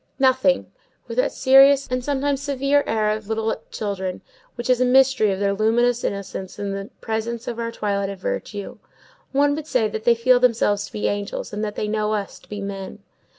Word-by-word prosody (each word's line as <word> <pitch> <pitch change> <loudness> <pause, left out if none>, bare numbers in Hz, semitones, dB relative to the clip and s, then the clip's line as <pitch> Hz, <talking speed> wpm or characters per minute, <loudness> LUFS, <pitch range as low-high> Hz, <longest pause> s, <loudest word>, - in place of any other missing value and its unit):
Nothing; 265 0 +2 0.4
with - - -7
that - - +2
serious 270 +1 +6
and 255 0 -1
sometimes 280 0 -1
severe 285 0 +1
air 215 -1 +1
of 215 -1 -4
little 220 0 -1
children, 190 -3 -4 0.3
which 240 -1 -5
is 255 -1 +3
a - - +6
mystery 255 -4 +4
of 190 - -2
their 200 0 +1
luminous 235 +3 +2
innocence 195 -1 -4
in 200 -1 -3
the 195 +1 -5
presence 225 +1 -3
of 235 -1 -4
our 230 0 -2
twilight 200 -3 -2
of 200 - -6
virtue. 200 +2 -5 0.5
One 285 +1 +3
would 305 +1 -5
say 245 -7 +2
that 220 0 -5
they 235 0 +5
feel 245 +2 +4
themselves 225 -4 +2
to - - -17
be 210 - -1
angels, 205 0 -3
and 210 +1 -3
that 210 -1 -3
they 210 - -2
know 215 0 0
us 200 -2 -5
to - - -23
be 205 -1 -5
men. 200 0 -6
225 Hz, 200 wpm, -22 LUFS, 205-260 Hz, 0.5 s, serious